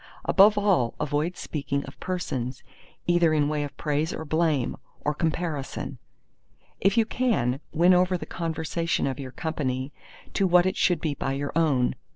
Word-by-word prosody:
Above 205 +1 +6
all 195 - +2
avoid 150 +5 -1
speaking 140 -2 -3
of - - -12
persons, 130 -9 -3 0.4
either 175 -2 +3
in 145 -1 +3
way 150 0 -1
of 145 0 -7
praise 150 +1 0
or 160 - -5
blame, 155 -4 +1 0.3
or 150 - 0
comparison. 160 -2 -3 0.8
If 195 +3 +2
you 225 - +5
can, 215 - 0
win 175 +3 +5
over 180 0 +3
the - - -7
conversation 165 0 -2
of 135 -1 -2
your 135 -2 -5
company 135 -3 -3 0.4
to 195 - +2
what 180 0 +5
it 185 - +1
should 175 -4 +2
be 155 -3 0
by 135 -1 -2
your 140 +1 -3
own. 145 -7 +2
155 Hz, 165 wpm, -26 LUFS, 140-175 Hz, 0.8 s, Above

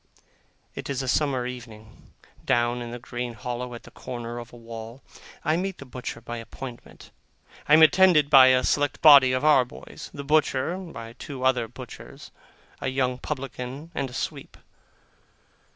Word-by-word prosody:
It - - -7
is 135 -1 -2
a - - -5
summer 130 -2 +1
evening, 115 -4 -10 0.3
down 120 0 +1
in 120 -1 -6
a 120 - -5
green 120 0 -5
hollow, 125 +1 -5
at 120 - -11
the - - -14
corner 120 -1 -6
of 120 0 -10
a - - -13
wall. 115 +2 -9 0.4
I 155 +2 +2
meet 190 +1 -3
the 140 - -10
butcher 125 -2 -7
by 120 +1 -7
appointment. 120 +2 -10 0.6
I 150 - +8
am 160 - +7
attended 160 -1 +6
by 135 -3 +8
a 130 0 +4
select 145 +1 +1
body 140 -4 +9
of 130 +3 0
our 150 -4 +6
boys; 125 - -11
the 140 - -7
butcher, 150 +1 +1
by 115 -11 -9
two 130 +1 -8
other 130 -3 +2
butchers, - - -11 0.5
a - - -3
young 130 -1 0
publican, 130 +4 -6
and 135 -5 -2
a - - -13
sweep. - - -5
130 Hz, 170 wpm, -25 LUFS, 120-140 Hz, 0.6 s, body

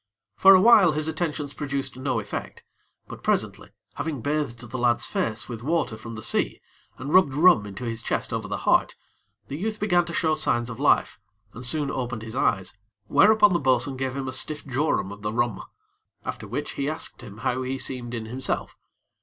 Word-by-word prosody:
For 195 - +8
awhile, 190 -4 +7
his 155 +1 -1
attentions 155 -3 -3
produced 140 -3 -3
no 130 -2 -1
effect; 105 -1 -6 0.4
but - - -10
presently, - - -1 0.2
having 150 -7 -4
bathed 145 -5 -2
the 130 - -3
lad's 120 -1 +2
face 110 -1 -2
with 115 -3 -7
water 155 -4 0
from 115 +1 -8
the 110 - -7
sea, 110 - 0 0.4
and 140 +4 -5
rubbed 165 -8 +5
rum 150 - +5
into 100 +3 -8
his 115 -1 -3
chest - - -2
over - - -3
the - - -5
heart, - - +3 0.5
the 140 - -5
youth 215 +4 -3
began 175 -4 +2
to 170 - -6
show 160 -1 +2
signs 120 -5 0
of 115 - -8
life, 145 -6 +2 0.3
and 125 - -9
soon 140 +3 0
opened 120 -3 -4
his 110 +1 -7
eyes, 100 -5 0 0.3
whereupon 210 - +5
the 170 - +2
bo'sun 130 0 +1
gave 130 0 -3
him 135 -1 -3
a - - -2
stiff 150 -1 -1
jorum 130 -7 0
of 100 0 -10
the 105 0 -2
rum, 120 0 -1 0.6
after - - -5
which - - -4
he 140 +1 -2
asked 155 -3 -5
him 105 -4 -11
how 130 0 0
he 130 +1 -3
seemed 125 -2 -3
in 115 -1 -4
himself. 125 +4 -3
130 Hz, 195 wpm, -25 LUFS, 120-155 Hz, 0.6 s, For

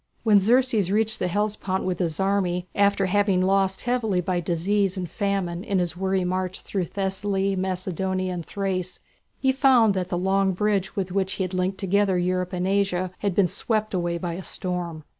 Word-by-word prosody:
When 215 -3 +6
Xerxes 225 -2 +2
reached 220 +1 +1
the 180 - 0
Hellespont 205 0 -1
with 185 -2 -2
his 165 -4 -1
army, 190 -2 0
after 200 -1 +3
having 200 0 +2
lost 190 0 +2
heavily 235 -6 0
by 180 0 -1
disease 185 +4 0
and 180 -1 -3
famine 190 -2 -2
in 200 -3 -1
his 175 -3 0
weary 190 0 0
march 185 0 -2
through 190 -3 -2
Thessaly, 195 +1 -1
Macedonia, 185 0 -2
and 175 -1 -4
Thrace, 185 -1 -3 0.4
he 265 - +2
found 260 -5 +4
that 185 -2 -2
the 175 - -1
long 190 +1 +2
bridge 200 0 0
with 190 -3 -2
which 190 0 0
he 190 - -2
had 185 0 -4
linked 185 +1 -1
together 195 -1 +1
Europe 180 +1 0
and 180 0 -2
Asia 190 -2 0
had 200 -3 -1
been 195 -2 +4
swept 215 +4 -1
away 175 -2 -1
by 170 -1 -3
a 180 - -5
storm. 175 -4 -4
190 Hz, 185 wpm, -24 LUFS, 180-200 Hz, 0.4 s, When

